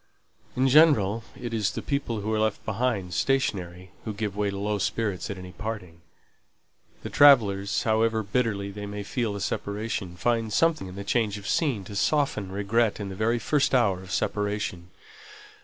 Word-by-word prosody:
In 130 +1 +2
general, 125 -8 +5 0.2
it 120 -2 -5
is 110 -3 +1
the - - -5
people 140 -6 -2
that 105 - -6
are 110 0 0
left 110 -1 -1
behind 110 -4 -1
stationary, 95 -7 -1
who 110 -2 -5
give 105 -2 -3
way 105 0 0
to 100 - -4
low 105 +1 -1
spirits 95 +2 -2
at 100 - -4
any 90 0 -9
parting; 95 -6 -6 1.0
the - - -5
travellers, 105 -8 +5
however 110 0 +2
bitterly 100 -2 -1
they 105 +1 -7
may 100 0 -5
feel 115 +1 -2
the 100 - -5
separation, 100 -2 -3
find 115 +2 0
something 165 - +2
in 90 - -9
the 100 - -6
change 105 0 0
of 100 0 -9
scene 135 - 0
to 100 +2 -9
soften 110 -6 0
regret 105 +3 +1
in 100 -1 -4
the 95 - -6
very 115 +4 +1
first 135 +5 +1
hour 100 -7 +2
of 95 -1 -11
separation. 105 -3 -2
105 Hz, 175 wpm, -26 LUFS, 100-115 Hz, 1.0 s, general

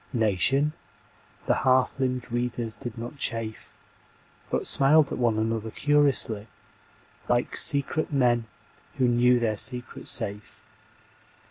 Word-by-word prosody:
Nation? 120 +7 +2 0.7
The - - +2
half 130 +1 +2
limbed 125 -2 -2
readers 120 -1 -2
did 120 +1 -7
not 120 +5 -7
chafe 115 -4 -4 0.7
But - - -2
smiled 145 +2 +4
at - - -4
one 115 -3 +1
another 110 0 -2
curiously 140 -6 +1 0.8
Like 120 0 0
secret 140 +3 0
men 120 -4 +1 0.5
who 130 -2 +2
know 120 +1 +3
their 110 -3 -1
secret 125 +2 -3
safe. 105 +1 -3
120 Hz, 115 wpm, -26 LUFS, 115-135 Hz, 0.8 s, smiled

